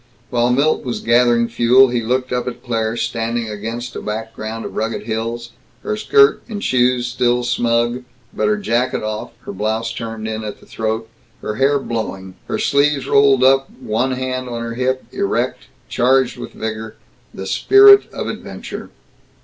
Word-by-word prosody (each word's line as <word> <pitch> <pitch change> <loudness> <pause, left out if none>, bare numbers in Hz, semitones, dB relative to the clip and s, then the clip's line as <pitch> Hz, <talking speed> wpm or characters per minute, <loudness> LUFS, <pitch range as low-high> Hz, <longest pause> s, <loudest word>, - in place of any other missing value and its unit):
While 120 -1 +2
Milt 140 +5 +2
was 125 -2 -3
gathering 120 0 +3
fuel 120 +3 +5
he 120 -1 0
looked 125 +3 -1
up 125 0 -1
at 120 -1 -6
Claire 115 -2 -1
standing 115 0 -2
against 115 +3 -5
a - - -5
background 110 +1 -5
of - - -7
rugged 110 -1 -2
hills, 115 +1 -4 0.3
her - - -2
skirt 420 - +4
and 205 -2 -5
shoes 125 -1 +2
still 125 0 +1
smug, 120 0 0 0.3
but - - 0
her 210 0 +2
jacket 125 - -1
off, 110 0 -4
her - - -8
blouse 110 +3 -2
turned 115 -1 -5
in 110 0 -4
at 105 -1 -6
the - - -18
throat, 110 0 -3 0.4
her 105 - -3
hair 140 +2 +3
blowing, 105 -7 -4
her - - -2
sleeves 140 -1 +1
rolled 140 -2 +4
up, 135 +1 +4
one 125 +5 -1
hand 130 0 -3
on 115 -1 -4
her 115 0 -4
hip, 130 +2 -1
erect, 400 +2 -2 0.2
charged 130 0 +2
with - - -8
vigor 110 0 -5 0.4
the 95 - -7
spirit 400 - +6
of - - -5
adventure. - - -7
120 Hz, 165 wpm, -19 LUFS, 115-130 Hz, 0.4 s, spirit